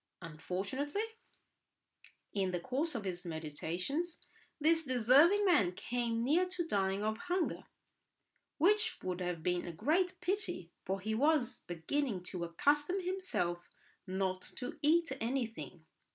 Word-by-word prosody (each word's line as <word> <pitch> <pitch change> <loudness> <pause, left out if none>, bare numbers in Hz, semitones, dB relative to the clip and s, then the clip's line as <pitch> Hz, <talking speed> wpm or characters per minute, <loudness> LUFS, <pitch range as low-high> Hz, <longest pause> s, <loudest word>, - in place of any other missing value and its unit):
Unfortunately, 195 - -3 1.3
in 195 -2 +1
the 180 -1 -1
course 275 - -1
of 225 - -2
his 180 -2 -4
meditations 175 - -3 0.3
this 325 +2 +4
deserving 275 - +5
man 215 - +4
came 235 +2 -1
near 330 +8 +3
to 360 -2 -2
dying 195 -5 +1
of 220 0 0
hunger; 360 0 -1 0.9
which 420 +7 +4
would 185 0 -2
have 175 -3 -2
been 180 0 0
a - - -3
great 350 - +1
pity, 355 - -2
for 190 +1 -1
he 215 +3 -1
was 285 +1 +2
beginning 185 - -1
to 180 -1 -4
accustom 290 - +2
himself 365 - -1 0.5
not 185 0 -1
to 250 - -7
eat 330 +2 +3
anything. 225 -8 -3
240 Hz, 125 wpm, -34 LUFS, -, 1.3 s, deserving